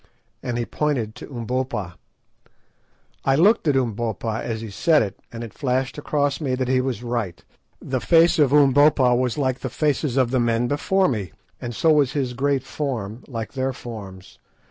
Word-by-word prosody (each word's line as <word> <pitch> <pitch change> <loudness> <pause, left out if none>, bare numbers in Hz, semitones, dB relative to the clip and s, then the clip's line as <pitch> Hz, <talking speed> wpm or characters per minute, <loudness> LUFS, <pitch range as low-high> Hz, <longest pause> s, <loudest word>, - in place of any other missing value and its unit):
and 120 -1 -3
he 120 - -1
pointed 130 -8 -1
to - - -10
Umbopa. 125 -6 -3 1.3
I 135 - +3
looked 195 +4 +4
at 145 - +3
Umbopa 115 -3 -1
as 115 -2 -3
he 110 -2 -7
said 155 - +3
it, 100 -3 -6
and 115 0 -6
it 115 - -8
flashed 130 -2 -1
across 145 -1 -1
me 130 -4 0
that 130 -1 -2
he 130 0 +2
was 130 -3 -3
right. 115 -7 -3 0.3
The 130 -2 -3
face 165 0 +4
of 145 -3 +4
Umbopa 145 -2 +5
was 125 +1 0
like 130 -3 0
the - - -4
faces 150 -3 0
of 125 -2 +2
the 130 - +2
men 120 0 +1
before 190 +8 +2
me, 105 -8 -3 0.3
and 120 -1 -5
so 160 - +3
was 145 -3 +2
his 130 -4 -1
great 135 +1 0
form 125 -6 -4
like 115 -4 -5
their 130 0 -1
forms. 100 -7 -10
130 Hz, 180 wpm, -23 LUFS, 115-145 Hz, 1.3 s, Umbopa